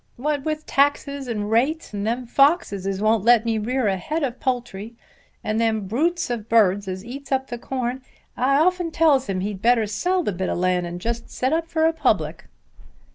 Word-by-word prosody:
"What 290 +2 -1
with 310 0 -2
taxes 280 -1 0
and 210 -3 -3
rates, 270 +6 +1
and 205 +1 -3
them 245 +2 -1
foxes 260 - +2
as 195 +1 -2
won't 215 -1 +3
let 235 0 +5
me 225 -1 0
rear 250 +3 -1
a 195 -2 +1
head 305 - -3
of 255 -2 -3
poultry 240 -5 -3 0.5
and 215 +1 -1
them 220 -3 0
brutes 320 - 0
of 225 -2 -4
birds 205 -3 +3
as 185 +2 -5
eats 275 +4 -9
up 265 0 0
the 240 - -4
corn, 255 0 -3 0.3
I 270 +3 +2
often 355 +2 +2
tells 310 -5 +3
him 185 -1 -1
he'd 200 -1 -4
better 235 -1 +3
sell 355 - 0
the - - -1
bit 185 0 -3
o' - - -1
land 180 0 0
and 175 +1 -6
just 235 +4 -4
set 260 +4 -1
up 330 0 0
for 320 -1 +1
a 325 - +3
public." 165 - 0
240 Hz, 205 wpm, -23 LUFS, 205-280 Hz, 0.5 s, let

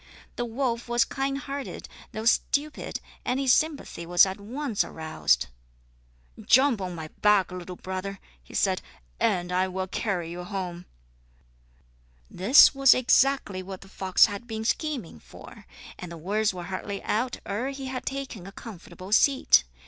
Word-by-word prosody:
The 240 - -2
wolf 235 0 -2
was 240 0 +3
kind 275 0 -2
hearted, 275 0 -6 0.2
though 220 +1 -5
stupid, 290 +5 0 0.2
and 250 +2 -1
his 265 -2 +4
sympathy 305 - -1
was 175 +3 +5
at 190 +1 -5
once 245 +1 -2
aroused. 155 - 0 1.0
"Jump 260 -4 +4
on 180 -2 -4
my 160 -1 -7
back, 210 -3 +4
little 180 0 -7
brother," 190 +2 -5 0.2
he - - -14
said, - - +1 0.4
"and 175 -1 +1
I 185 +1 +2
will 185 0 -3
carry 180 -3 -3
you 175 +1 -6
home." 180 -2 -5 1.4
This 215 - +7
was 275 -1 +6
exactly 255 -5 +2
what 190 0 -8
the 195 - -13
fox 190 -1 +4
had 205 +3 -6
been 220 -1 -5
scheming 255 - -2
for, - - -14 0.3
and 180 -2 -7
the 170 - -7
words 205 +6 0
were 180 -2 -7
hardly 195 +2 -5
out 240 +4 -1
ere 215 +7 -2
he 275 -1 -6
had 260 -1 -4
taken 270 -9 -5
a - - -9
comfortable 185 -3 -11
seat. 240 - +5
205 Hz, 155 wpm, -26 LUFS, 185-260 Hz, 1.4 s, This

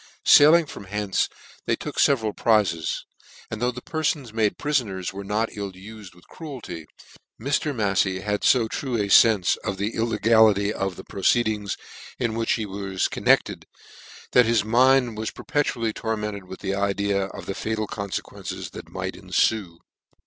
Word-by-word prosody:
Sailing 160 +3 +7
from 100 - -10
hence 105 0 -1 0.4
they - - +2
took - - -7
feveral 110 -6 +2
prizes; 100 -8 +1 0.5
and 110 0 -5
though 125 - +2
the 125 0 -7
perfons 150 -7 -2
made 110 -2 +1
prifoners 105 -12 -1
were 100 +1 -6
not 105 +3 -1
ufed 100 -1 -9
with 90 - -21
cruelty, 115 - -8 0.5
Mr, 140 +4 0
Mafiey 100 -5 0
had 105 0 -2
Ib 120 -4 +4
true 130 -5 -2
a 100 -1 -1
fenfe 105 -3 +5
of 100 -3 -4
the 100 +3 -2
illegality 110 -2 +3
of 95 -3 -3
the - - -10
proceedings 105 -1 0 0.4
in 115 -3 -1
which 115 0 0
he 110 - -2
was 95 -1 -2
concerned, - - +1 0.6
that 125 -2 +5
his 115 -3 +2
mind 125 0 +3
was 110 - -2
per - - -11
petually 115 -6 -1
tormented 105 -3 -4
with 95 - -10
the 95 -1 -2
idea 100 0 0
of 95 - -9
the 95 - -3
fatal'con 110 -1 -4
fequences - - -6
that - - -10
might - - -4
enfue. 95 -7 0
105 Hz, 155 wpm, -24 LUFS, 100-115 Hz, 0.6 s, Sailing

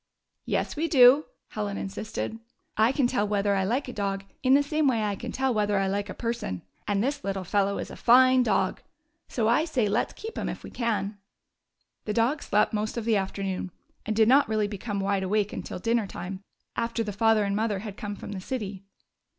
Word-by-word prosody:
"Yes, - - -1
we 320 +2 0
do," 270 0 +7 0.2
Helen 205 -2 -3
insisted. 220 +3 -4 0.4
"I 220 +3 +4
can 270 -1 +1
tell 240 -4 +1
whether 205 -1 +1
I 195 -1 +1
like 245 +9 0
a 250 - -6
dog 195 -1 -2 0.2
in 260 0 +5
the 285 - +4
same 305 +1 +1
way 230 -5 +2
I 205 -1 0
can 235 +4 -6
tell 265 -1 0
whether 210 -2 +1
I 195 - +2
like 200 +1 -2
a - - -6
person. 230 - -3 0.2
And 205 0 +1
this 280 +2 -2
little 195 -1 -2
fellow 200 +2 +1
is - - -5
a - - -8
fine 255 +1 +6
dog. 245 - +1 0.5
So 225 -3 0
I 240 +7 +4
say 265 -9 0
let 210 +4 +1
's - - -14
keep 445 +1 -7
him - - -2
if - - -6
we - - -9
can." 215 -4 -2 0.9
The 210 - -1
dog 240 +7 +1
slept 210 +2 +2
most 215 +2 -2
of 230 - -3
the 230 -2 +3
afternoon, 190 -1 -3 0.3
and 215 - -2
did 220 0 +5
not 270 0 +5
really 215 -1 +1
become 205 0 -4
wideawake 200 +1 0
until - - -5
dinner 230 +2 0
time, 185 +2 -7 0.3
after 230 0 -1
the 210 -2 -4
father 225 +1 +3
and 200 0 -1
mother 215 -1 0
had 205 -3 -6
come 205 0 -5
from 205 - -8
the 195 -2 -5
city. 205 -4 -4
215 Hz, 215 wpm, -27 LUFS, 200-245 Hz, 0.9 s, do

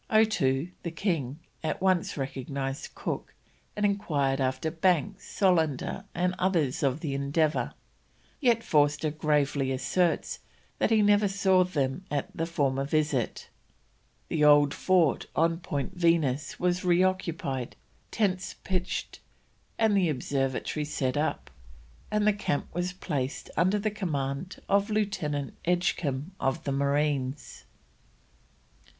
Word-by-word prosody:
Otoo, 180 -10 +2
the 170 - -3
king, 165 - -2 0.3
at 155 - -1
once 185 -4 +1
recognised 135 0 -4
Cook, - - -4 0.4
and 210 - +1
enquired 145 -9 +1
after 130 +4 0
Banks, 170 -2 0
Solander, 175 -2 +1
and 180 +1 +1
others 170 -8 +1
of 140 +2 +1
the 145 -4 -2
Endeavour; 145 +3 0 0.6
yet 235 -5 +3
Forster 150 -4 +2
gravely 145 -3 +1
asserts 165 +6 0 0.4
that - - +2
he 220 -2 +4
never 205 0 +4
saw 190 -1 +3
them 145 -2 -1
at 145 -1 -3
the 165 - -1
former 135 -5 0
visit. 150 -4 -1 0.8
The 150 - 0
old 145 -1 +6
fort 180 -6 +2
on 165 +1 +2
Point 165 0 -3
Venus 165 -5 +1
was 180 0 +1
reoccupied, 175 -8 0 0.3
tents 195 -4 -1
pitched, 185 -1 -3 0.6
and 220 -2 +3
the 185 -4 +3
observatory 135 +1 -1
set 135 -3 -1
up, 150 +2 -1 0.6
and 210 0 +1
the 210 - +5
camp 200 -8 -1
was 175 +1 -1
placed 145 -7 -4
under 185 +6 +3
the 210 +1 -1
command 155 -4 -3
of 200 +2 +2
Lieutenant 190 -10 -1
Edgecombe 170 -4 0
of 135 0 -1
the 140 - -2
Marines. 140 0 -1
160 Hz, 120 wpm, -28 LUFS, 140-185 Hz, 0.8 s, old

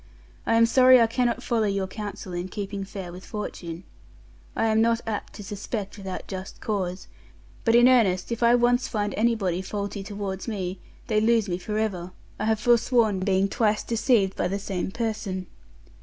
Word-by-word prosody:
I 230 - +3
am 230 0 +6
sorry 255 +2 +7
I 230 - +6
cannot 240 +1 0
follow 225 -3 +1
your 195 -1 0
counsel 200 -1 -7
in 175 +1 -3
keeping 200 0 -5
fair 195 -3 -7
with 180 +2 -10
Fortune. 175 -5 -6 0.7
I 225 - +1
am 220 0 +3
not 230 0 +3
apt 215 -2 -4
to 205 - -9
suspect 205 +1 -5
without 190 -3 -6
just 190 -1 -7
cause, 190 -4 -3 0.6
but 230 -1 +3
in 240 +1 +7
earnest 220 -7 +3
if 235 - -3
I 235 +1 +6
once 245 +1 +3
find 205 -5 -2
anybody 210 -6 +1
faulty 200 +1 -4
towards 200 -1 -5
me, 190 -4 -3 0.3
they 215 -3 +1
lose 225 -1 +3
me 175 -1 -2
for 210 +4 -3
ever; 185 -5 -2 0.3
I 215 - -1
have 220 -1 +2
forsworn 230 -3 +3
being 190 0 +2
twice 215 -1 +1
deceived 225 -4 +2
by - - 0
the 195 +2 -2
same 195 -3 -3
person. 215 -4 -3
210 Hz, 180 wpm, -25 LUFS, 190-230 Hz, 0.7 s, sorry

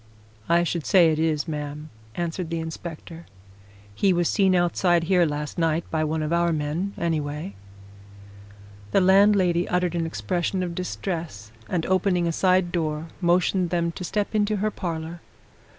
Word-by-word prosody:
"I 170 +1 +4
should 170 -1 -2
say 175 -4 +5
it 155 - -1
is, 160 -1 0
ma'am," 150 0 -5 0.2
answered 170 0 -3
the 165 0 -2
inspector. 165 +1 -8 0.7
"He 190 - +2
was 175 -1 +1
seen 190 -2 +3
outside 175 -1 +2
here 175 0 +3
last 150 +2 -4
night 165 0 +1
by 160 -1 0
one 155 0 -1
of 155 +2 -1
our 170 0 +2
men, 160 +6 -2
anyway." 150 -8 -2 1.4
The - - +5
landlady 190 -2 +4
uttered 180 -1 0
an 165 -1 -1
expression 180 +2 -2
of 175 -1 -3
distress, 170 - -5 0.2
and 170 -3 -1
opening 185 -1 +1
a 170 - +1
side 185 +1 +2
door, 160 -2 -2
motioned 180 +1 +2
them 170 -1 0
to 180 - -8
step 205 +4 -2
into 210 0 +1
her 210 +1 -1
parlour. 165 -2 -5
170 Hz, 155 wpm, -24 LUFS, 160-180 Hz, 1.4 s, say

